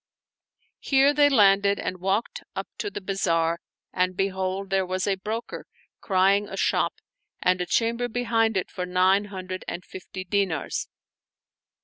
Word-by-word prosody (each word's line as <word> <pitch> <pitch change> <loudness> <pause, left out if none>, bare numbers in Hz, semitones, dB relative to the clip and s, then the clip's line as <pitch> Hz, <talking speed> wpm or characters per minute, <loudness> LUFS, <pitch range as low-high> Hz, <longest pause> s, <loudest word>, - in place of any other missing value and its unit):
Here 275 +1 +4
they 290 0 +5
landed 200 -5 +4
and 185 - -4
walked 200 - -1
up - - -4
to 415 - -2
the 300 - -6
bazaar 170 -4 0 0.3
and 185 0 0
behold, 190 0 -2
there 195 0 +3
was 185 0 -2
a 200 - +2
broker 215 +4 -5 0.3
crying 195 +1 +2
a 195 - -6
shop - - +1 0.4
and 180 0 +2
a 180 - -2
chamber 235 +4 +1
behind 225 -3 +1
it 185 - -2
for 180 -1 -4
nine 185 +3 +3
hundred 185 -2 -6
and 180 - -5
fifty 185 0 -8
dinars. 185 -5 -1
195 Hz, 145 wpm, -25 LUFS, 185-215 Hz, 0.4 s, they